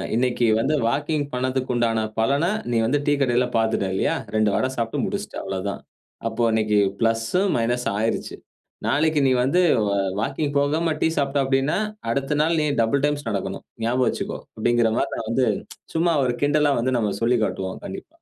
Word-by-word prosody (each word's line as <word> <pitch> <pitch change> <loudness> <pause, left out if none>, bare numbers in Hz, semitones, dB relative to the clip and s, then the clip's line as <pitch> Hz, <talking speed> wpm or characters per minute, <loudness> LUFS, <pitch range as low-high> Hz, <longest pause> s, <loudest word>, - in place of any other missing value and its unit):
இன்னைக்கு 125 0 +1
வந்து 150 - +1
வாக்கிங் 145 +3 0
பண்ணதுக்கு 130 0 -1
உண்டான 115 -2 +1 0.2
பலன 140 +8 +2 0.3
நீ 115 - +2
வந்து 145 +5 +1
டீ 145 - +3
கடையில 125 -1 +2
பார்த்துட்டா 110 -3 +1
இல்லையா? 95 - +1 0.2
2 110 -1 +3
வடை 130 - +1
சாப்பிட்டு 115 -1 -1
முடிச்சுட்ட - - -4
அவ்வளதான். 95 +1 -4 0.5
அப்போ 120 - -1
இன்னைக்கு 110 -1 +2 0.2
பிளஸ், 115 0 +1 0.3
மைனஸ் 120 +2 0
ஆயிருச்சு. 110 +1 -1 0.5
நாளைக்கு 155 +1 +2
நீ - - +3
வந்து 145 +8 +2 0.3
வ - - 0 0.3
வாக்கிங் 145 +4 -2
போகாம 155 +3 +1
டீ - - +4
சாப்பிட்டா 140 0 +1
அப்டின்னா, 135 +4 +1 0.3
அடுத்த 140 +4 -1
நாள் 165 +1 +2
நீ - - +1 0.2
டபிள் 135 +5 +1
டைம்ஸ் 145 -4 -2
நடக்கணும். 100 -3 -4 0.2
ஞாபகம் 125 +2 +2
வச்சுக்கோ - - -4 0.2
அப்டிங்குற 120 0 +2
மாரி - - 0
நான் 110 - -5
வந்து 125 +2 +2 0.5
சும்மா 170 +1 +2
ஒரு 120 -1 0
கிண்டலா 145 0 +3
வந்து 130 +1 0
நம்ம 105 -3 0
சொல்லி 120 +1 +3
காட்டுவோம் 95 -1 -4
கண்டிப்பா. - - -8
125 Hz, 170 wpm, -23 LUFS, 115-145 Hz, 0.5 s, டீ